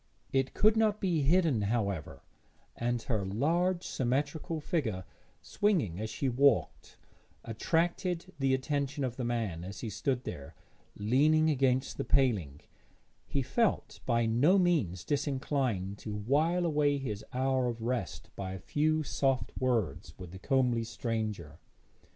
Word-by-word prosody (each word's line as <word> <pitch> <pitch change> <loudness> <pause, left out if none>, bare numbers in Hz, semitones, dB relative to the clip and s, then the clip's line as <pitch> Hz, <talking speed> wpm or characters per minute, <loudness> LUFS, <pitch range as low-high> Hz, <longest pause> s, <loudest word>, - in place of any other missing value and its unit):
It 135 -1 +1
could 215 +1 +5
not 215 -1 +2
be 175 -5 +1
hidden, 155 - +3
however, 100 -6 -2 0.5
and 120 0 -1
her 110 -6 -1
large 170 - 0
symmetrical 140 +5 -1
figure, 130 - -2 0.4
swinging 155 - 0
as 110 0 -3
she 135 +5 -2
walked, 130 0 +1 0.5
attracted 170 - -1
the 135 -1 +3
attention 140 +1 -2
of 125 -2 -2
the 125 - -4
man; 115 -8 -2
as 95 +3 -7
he 110 - -4
stood 125 +5 -1
there, 70 -1 -7 0.4
leaning 150 +9 +3
against 130 -2 +1
the - - 0
paling, 100 - +1 0.7
he 140 - -1
felt 195 - 0
by 115 -2 +2
no 130 - +4
means 145 - +1
disinclined 130 -9 -1
to 105 -2 -5
while 155 - +1
away 145 -3 +2
his 110 -7 -4
hour 130 0 +1
of 115 -1 -4
rest 120 -4 -3
by 95 -1 -5
a 95 - -6
few 155 - +1
soft 135 -6 0
words 115 - -1
with 90 -2 -9
the 95 - -9
comely 125 0 +1
stranger. 110 - -4
130 Hz, 140 wpm, -31 LUFS, 110-150 Hz, 0.7 s, could